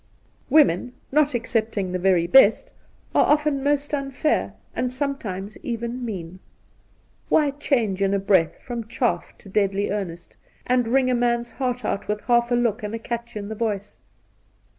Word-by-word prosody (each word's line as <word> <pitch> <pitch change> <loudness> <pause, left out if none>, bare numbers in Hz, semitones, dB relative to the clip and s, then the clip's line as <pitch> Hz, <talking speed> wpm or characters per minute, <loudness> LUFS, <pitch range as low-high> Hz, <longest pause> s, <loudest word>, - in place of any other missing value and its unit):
Women, 250 - +4 0.2
not 290 -1 +3
excepting 220 -5 -1
the 185 - -2
very 180 -2 +3
best, 220 +2 +5 0.4
are - - +4
often 295 -2 +2
most 290 +1 0
unfair, 275 +1 0 0.2
and 250 0 -1
sometimes 230 -8 -4
even 235 +1 -4
mean. 185 -5 -6 0.9
Why 295 -2 +3
change 240 -9 0
in 195 0 +2
a - - +1
breath 190 -4 +2
from 235 -3 -5
chaff 240 +1 -2
to - - -15
deadly 200 0 0
earnest, 175 -5 -5 0.3
and 250 -2 +2
wring 255 +1 +2
a - - +2
man's 240 0 0
heart 250 -3 -3
out 200 - -2
with 210 0 -2
half 240 -1 +2
a 245 - +2
look 235 -3 +1
and 210 +1 -4
a - - -5
catch 235 0 -4
in 200 -1 -5
the 220 - -4
voice 205 -2 -3
235 Hz, 160 wpm, -23 LUFS, 200-255 Hz, 0.9 s, best